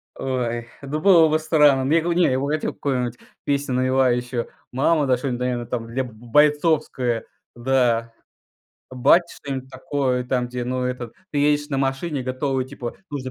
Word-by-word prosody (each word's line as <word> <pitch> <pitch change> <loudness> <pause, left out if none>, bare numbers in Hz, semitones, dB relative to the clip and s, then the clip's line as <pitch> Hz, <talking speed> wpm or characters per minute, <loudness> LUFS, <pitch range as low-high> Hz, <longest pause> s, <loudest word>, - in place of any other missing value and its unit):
Ой, 120 -3 -2 0.2
ну 145 +2 -3
было 170 -2 +6
бы 155 0 +2
странно. 150 -4 +4
Мне 160 +5 +3
го 170 +1 0
не, 175 0 +3
я 130 0 +1
бы 140 - -2
хотел 155 +1 -1
какую-нибудь 125 -4 -2 0.3
песню 140 -2 0
навевающую. 125 -2 +1 0.2
"Мама", 145 +3 +2
да 130 -1 +3
что-нибудь, 125 -1 -3
наверное, 125 -1 -1
там, 115 -1 -4
для 125 +3 -2
б 125 - -9
бойцовское. 135 -1 +1 0.3
Да. 120 -2 +1 0.8
Бате 170 +7 +3
что-нибудь 130 -2 -6
такое, 130 -1 -1
там, 125 -1 -1
где, 125 0 -4
ну 130 0 -1
это, 125 -2 -4 0.2
ты 145 - -2
едешь 145 0 +2
на 135 - 0
машине, 135 +2 -1
готовый, 130 +1 -2
типа, 130 -3 -6
нужно 135 -3 -5
130 Hz, 165 wpm, -22 LUFS, 125-145 Hz, 0.8 s, было